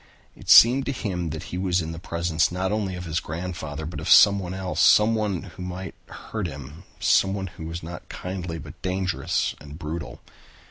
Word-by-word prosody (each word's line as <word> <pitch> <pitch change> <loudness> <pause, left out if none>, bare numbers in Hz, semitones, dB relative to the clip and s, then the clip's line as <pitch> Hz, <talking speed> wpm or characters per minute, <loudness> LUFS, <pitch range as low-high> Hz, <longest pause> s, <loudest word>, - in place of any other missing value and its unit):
It - - -12
seemed 130 +4 +8
to - - +1
him 90 -9 -3
that 80 +2 -5
he 90 - -2
was 95 -1 +1
in 80 -1 -3
the 80 - -7
presence 85 -1 0
not 95 +2 -1
only 105 -3 -1
of 90 0 -6
his 80 +1 -1
grandfather 80 -3 -5
but 85 - -6
of - - -4
someone 100 -3 +6
else, 95 -1 -4
someone 105 -4 +4
who 90 -2 -11
might 90 +1 -6
hurt 110 -5 -5
him, 75 +4 -10
someone 95 0 +2
who 85 -3 -8
was 85 +1 -6
not 85 +1 -9
kindly 90 -2 -5
but 75 0 -11
dangerous 95 -2 -1
and 75 +1 -10
brutal. 80 -1 -6
90 Hz, 185 wpm, -25 LUFS, 80-95 Hz, -, seemed